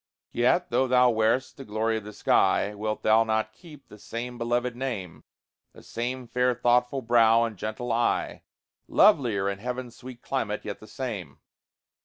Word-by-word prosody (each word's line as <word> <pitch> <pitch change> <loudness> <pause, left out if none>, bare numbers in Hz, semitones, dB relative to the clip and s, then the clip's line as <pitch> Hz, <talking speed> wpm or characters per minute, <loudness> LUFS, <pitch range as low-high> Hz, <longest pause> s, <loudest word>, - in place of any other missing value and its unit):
Yet 175 +9 +1
though 130 - +2
thou 125 -1 +4
wear'st 115 +4 0
the 135 - -8
glory 110 0 -1
of 110 - -6
the 105 - -9
sky, 105 0 +2
Wilt 110 +1 -4
thou 110 +1 +5
not 110 0 -1
keep 150 +1 -15
the 105 - -14
same 120 +3 -6
beloved 120 +1 -1
name, 115 -10 -5 0.5
The - - -15
same 125 +1 -4
fair 125 +1 +1
thoughtful 125 +2 +1
brow, 115 -1 +4
and 115 -2 -3
gentle 110 +5 -4
eye, 120 +1 0 0.5
Lovelier 120 - +3
in 100 0 -3
heaven's 125 +1 -5
sweet 125 -1 -11
climate, 110 -6 -3
yet 100 -1 -5
the 110 - -14
same? 105 - -6
120 Hz, 165 wpm, -26 LUFS, 110-125 Hz, 0.5 s, thou